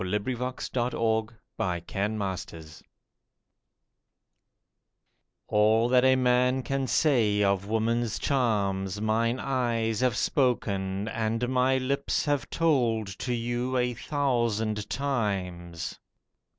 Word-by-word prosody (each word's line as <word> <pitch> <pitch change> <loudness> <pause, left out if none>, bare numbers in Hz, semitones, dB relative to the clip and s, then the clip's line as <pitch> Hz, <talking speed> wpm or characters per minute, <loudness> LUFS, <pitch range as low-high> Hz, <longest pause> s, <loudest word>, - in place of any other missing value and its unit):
A 95 +3 0
BACHELOR 125 +3 -3 0.2
TO 120 -1 -1
A 110 -1 +1 0.3
MARRIED 90 -2 -1
FLIRT 95 -6 -4 2.6
ALL 110 +3 +3
that 125 0 +4
a 130 0 +5
man 125 0 +2
can 135 0 -1
say 115 -6 +3
of 100 0 +1
woman's 115 0 0
charms, 100 -7 0
Mine 115 +3 +1
eyes 115 -5 0
have 125 -4 +1
spoken 100 -7 0
and 115 +2 -1
my 130 +1 +2
lips 140 +2 -1
have 145 -4 0
told 125 -9 +1
To 125 - -3
you 120 +2 -1
a 125 0 +1
thousand 115 -6 -1
times. 95 - -3
115 Hz, 105 wpm, -27 LUFS, 105-130 Hz, 2.6 s, a